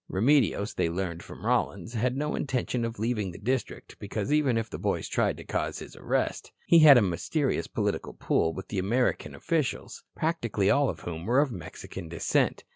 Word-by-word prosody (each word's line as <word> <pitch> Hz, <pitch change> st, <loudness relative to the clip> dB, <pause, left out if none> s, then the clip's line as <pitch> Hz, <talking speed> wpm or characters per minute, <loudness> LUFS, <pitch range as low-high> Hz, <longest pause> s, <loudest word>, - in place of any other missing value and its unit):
Remedios, 110 Hz, -1 st, +2 dB
they 85 Hz, -, 0 dB
learned 85 Hz, -1 st, -3 dB
from -, -, -11 dB
Rollins, 100 Hz, +3 st, 0 dB
had 125 Hz, +3 st, 0 dB
no 150 Hz, +1 st, -1 dB
intention 125 Hz, -2 st, -1 dB
of 115 Hz, 0 st, -3 dB
leaving 110 Hz, -2 st, -1 dB
the 90 Hz, -, -9 dB
district 125 Hz, +5 st, -3 dB
because 105 Hz, +5 st, -2 dB
even 140 Hz, -6 st, +3 dB
if 115 Hz, 0 st, -1 dB
the -, -, -7 dB
boys -, -, -1 dB
tried -, -, 0 dB
to -, -, -9 dB
cause -, -, -2 dB
his -, -, -9 dB
arrest -, -, -2 dB
he 170 Hz, -, +6 dB
had 150 Hz, -4 st, +9 dB
a 120 Hz, -, +5 dB
mysterious 90 Hz, -4 st, -1 dB
political -, -, -2 dB
pull 80 Hz, -, +1 dB
with 95 Hz, +3 st, -8 dB
the 100 Hz, -, -2 dB
American 120 Hz, +7 st, 0 dB
officials, 165 Hz, -5 st, -2 dB
practically 120 Hz, -, 0 dB
all 140 Hz, -1 st, +3 dB
of -, -, -5 dB
whom 85 Hz, 0 st, -6 dB
were 125 Hz, +4 st, +4 dB
of 145 Hz, -2 st, +2 dB
Mexican 90 Hz, -1 st, -8 dB
descent. 85 Hz, -, 0 dB
115 Hz, 190 wpm, -28 LUFS, 95-135 Hz, -, had